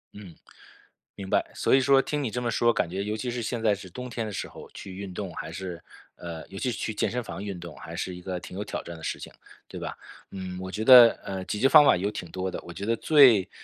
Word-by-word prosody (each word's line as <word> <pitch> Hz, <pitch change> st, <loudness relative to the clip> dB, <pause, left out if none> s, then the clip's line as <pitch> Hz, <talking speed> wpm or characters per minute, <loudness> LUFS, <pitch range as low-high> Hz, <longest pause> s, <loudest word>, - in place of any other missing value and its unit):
嗯， 100 Hz, -5 st, -11 dB, 0.8 s
明 95 Hz, -2 st, -8 dB
白。 -, -, +1 dB
所 -, -, +1 dB
以 135 Hz, -, +7 dB
说 135 Hz, +1 st, +5 dB
听 145 Hz, +1 st, -3 dB
你 125 Hz, -, -1 dB
这 125 Hz, +3 st, -3 dB
么 120 Hz, -1 st, -1 dB
说， 120 Hz, +1 st, +3 dB
感 -, -, 0 dB
觉 95 Hz, +3 st, -3 dB
尤 105 Hz, +1 st, -2 dB
其 115 Hz, +3 st, -3 dB
是 120 Hz, 0 st, -3 dB
现 115 Hz, 0 st, -3 dB
在 105 Hz, -2 st, +4 dB
是 95 Hz, -1 st, -8 dB
冬 125 Hz, +7 st, -7 dB
天 115 Hz, -2 st, -3 dB
的 110 Hz, -, -5 dB
时 95 Hz, -, -4 dB
候， -, -, -12 dB
去 95 Hz, -2 st, -9 dB
运 100 Hz, -2 st, -7 dB
动 95 Hz, -2 st, -5 dB
还 80 Hz, 0 st, -6 dB
是 90 Hz, -1 st, -6 dB, 0.3 s
呃， 85 Hz, -2 st, -8 dB
尤 95 Hz, 0 st, -8 dB
其 130 Hz, -, -1 dB
是 -, -, -5 dB
去 110 Hz, -, -3 dB
健 105 Hz, -, 0 dB
身 125 Hz, 0 st, -3 dB
房 100 Hz, -, -7 dB
运 100 Hz, -4 st, -5 dB
动， 85 Hz, -3 st, -9 dB
还 80 Hz, -, -9 dB
是 90 Hz, +1 st, -4 dB
一 90 Hz, -, -10 dB
个 90 Hz, 0 st, -4 dB
挺 90 Hz, -, -10 dB
有 100 Hz, -, -2 dB
挑 -, -, -5 dB
战 85 Hz, -, -8 dB
的 80 Hz, -, -13 dB
事 -, -, -3 dB
情， -, -, -9 dB, 0.4 s
对 -, -, -7 dB
吧？ -, -, -6 dB, 0.3 s
嗯， 95 Hz, -1 st, -6 dB
我 95 Hz, -, -6 dB
觉 110 Hz, -, -3 dB
得， 120 Hz, -1 st, +10 dB
呃， 95 Hz, -1 st, -5 dB
解 105 Hz, -, -3 dB
决 135 Hz, -, +5 dB
方 145 Hz, +2 st, +8 dB
法 -, -, +6 dB
有 100 Hz, +4 st, -1 dB
挺 85 Hz, -, -7 dB
多 95 Hz, +2 st, -3 dB
的， -, -, -5 dB
我 85 Hz, -, -9 dB
觉 100 Hz, +5 st, -6 dB
得 115 Hz, -, +1 dB
最， 130 Hz, -, +6 dB
100 Hz, 305 characters per minute, -26 LUFS, 90-120 Hz, 0.8 s, 得